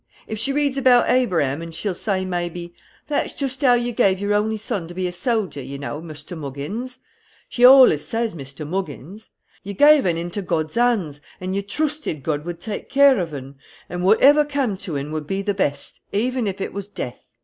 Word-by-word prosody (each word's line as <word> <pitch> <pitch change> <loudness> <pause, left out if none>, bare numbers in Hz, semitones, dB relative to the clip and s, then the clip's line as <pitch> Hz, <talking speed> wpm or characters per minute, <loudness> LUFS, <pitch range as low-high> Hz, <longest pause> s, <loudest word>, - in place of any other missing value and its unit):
If 220 - -5
she 245 +5 0
reads 280 -1 0
about 250 -2 +4
Abraham, 165 - +1
she'll 185 +4 -2
say, 190 0 -2
maybe, 175 -1 -4 0.3
'That's 295 - -1
joost 265 -2 -4
how 250 -3 +5
you 240 0 -1
gave 190 -4 +2
your 205 +1 0
only 215 +1 +1
son 200 -5 -3
to 175 - -10
be 185 0 -2
a 180 - -2
soldier, 190 - -1
you 135 +2 -7
know, 145 +2 -5
Muster 155 +1 -9
Moggins;' 160 - -6 0.5
she 245 - -2
allus 255 - +8
says 230 0 -1
Muster 140 -1 -8
Moggins; 185 - -6 0.3
'you 200 +1 -7
gave 290 -2 +6
un 170 -2 +1
into 175 +4 -4
God's 160 -4 -2
hands, 215 -12 +1 0.2
and 185 +1 -3
you 200 - 0
troosted 295 - -3
God 150 -1 -2
would 175 -1 -5
take 205 +4 -6
care 280 -3 +5
of 170 -3 -3
un; 135 -1 -8 0.3
and 180 +1 -4
whatever 275 +10 +6
cam' 280 -7 -1
to 170 -6 -4
un 140 +2 -5
would 155 -1 -4
be 195 +3 -2
the 205 0 0
best, 145 -8 -2
even 245 +2 0
if 195 0 -4
it - - -4
was 200 -1 -5
death.' 125 -11 -7
195 Hz, 200 wpm, -22 LUFS, 160-240 Hz, 0.5 s, allus